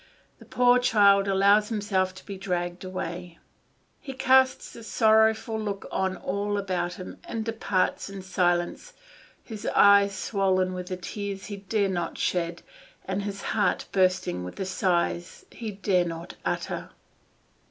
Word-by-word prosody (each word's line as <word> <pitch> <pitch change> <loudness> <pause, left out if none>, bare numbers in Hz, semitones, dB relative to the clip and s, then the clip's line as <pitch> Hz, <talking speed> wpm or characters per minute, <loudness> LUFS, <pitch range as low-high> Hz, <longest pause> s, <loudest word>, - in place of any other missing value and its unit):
The - - -14
poor 250 0 +4
child 200 -4 +4
allows 200 +2 +4
himself 195 -4 -1
to 185 - -13
be 200 - -6
dragged 180 -2 -3
away; 180 -2 -6 0.6
he 270 - -8
casts 260 0 +3
a 230 - -10
sorrowful 220 0 +3
look 200 -2 -4
on 190 0 -1
all 205 +2 -2
about 180 -3 -2
him, 185 - -9
and 225 -1 -4
departs 205 -5 -1
in 195 -1 -8
silence, 180 - 0 0.5
his 220 -3 -7
eyes 200 -1 +6
swollen 190 -3 0
with 180 -1 -6
the 185 -1 -4
tears 195 +1 -5
he 205 -1 -6
dare 200 +1 0
not 175 -3 -3
shed, 170 -1 -1 0.4
and 190 +1 -2
his 200 -1 -5
heart 205 -4 +1
bursting 185 - +1
with 90 - -7
the 190 - -4
sighs 175 -1 -1
he 225 -2 -6
dare 195 -3 +1
not 165 +1 -6
utter. - - -3
195 Hz, 145 wpm, -26 LUFS, 185-210 Hz, 0.6 s, eyes